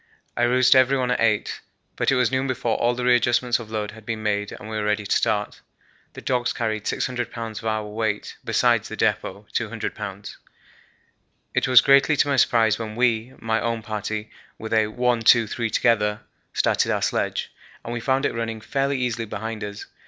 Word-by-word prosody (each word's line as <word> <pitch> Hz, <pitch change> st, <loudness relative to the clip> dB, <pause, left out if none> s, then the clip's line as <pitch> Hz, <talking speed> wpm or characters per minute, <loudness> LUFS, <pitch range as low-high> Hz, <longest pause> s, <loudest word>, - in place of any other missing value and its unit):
I -, -, +2 dB
roused 130 Hz, +1 st, +4 dB
everyone 130 Hz, -1 st, +3 dB
at 125 Hz, -, 0 dB
8, 110 Hz, -2 st, 0 dB, 0.3 s
but -, -, +1 dB
it -, -, +3 dB
was 125 Hz, -1 st, +2 dB
noon 130 Hz, +1 st, 0 dB
before 125 Hz, -3 st, -1 dB
all 120 Hz, +1 st, +1 dB
the 125 Hz, 0 st, -3 dB
readjustments 120 Hz, 0 st, +3 dB
of 115 Hz, -2 st, -9 dB
load 105 Hz, -1 st, -3 dB
had 110 Hz, 0 st, -13 dB
been 110 Hz, 0 st, -4 dB
made 105 Hz, -1 st, -1 dB
and 110 Hz, -, -9 dB
we 110 Hz, -, -5 dB
were 105 Hz, -, -1 dB
ready 105 Hz, 0 st, 0 dB
to -, -, +1 dB
start. 105 Hz, -1 st, 0 dB, 0.5 s
The -, -, -9 dB
dogs 125 Hz, -2 st, 0 dB
carried 110 Hz, -2 st, -2 dB
600 125 Hz, -1 st, -2 dB
lbs. 115 Hz, -2 st, -6 dB
of 115 Hz, -, -11 dB
our 110 Hz, -1 st, -1 dB
weight 105 Hz, 0 st, -3 dB
besides -, -, +2 dB
the -, -, -7 dB
depot -, -, -1 dB
(200 -, -, -2 dB
lbs.). -, -, -7 dB, 1.2 s
It -, -, +1 dB
was 125 Hz, -2 st, +8 dB
greatly 140 Hz, +2 st, +4 dB
to -, -, +3 dB
my 140 Hz, -1 st, +1 dB
surprise 115 Hz, -3 st, +3 dB
when 110 Hz, -1 st, -5 dB
we 120 Hz, 0 st, +1 dB
my 110 Hz, 0 st, -1 dB
own 115 Hz, -1 st, -2 dB
party 105 Hz, 0 st, -4 dB, 0.3 s
with 110 Hz, 0 st, -6 dB
a 110 Hz, -1 st, +3 dB
'one, 120 Hz, +1 st, 0 dB
two, 115 Hz, +1 st, +6 dB
three 115 Hz, +2 st, -3 dB
together' 105 Hz, -2 st, +1 dB, 0.3 s
started -, -, +1 dB
our -, -, 0 dB
sledge, -, -, -1 dB, 0.3 s
and 115 Hz, -, -4 dB
we 120 Hz, -, -3 dB
found 135 Hz, +3 st, +1 dB
it -, -, 0 dB
running 115 Hz, -1 st, -3 dB
fairly 135 Hz, +4 st, -1 dB
easily 120 Hz, -2 st, -2 dB
behind 110 Hz, +1 st, -5 dB
us. 105 Hz, 0 st, -6 dB
115 Hz, 195 wpm, -23 LUFS, 110-125 Hz, 1.2 s, was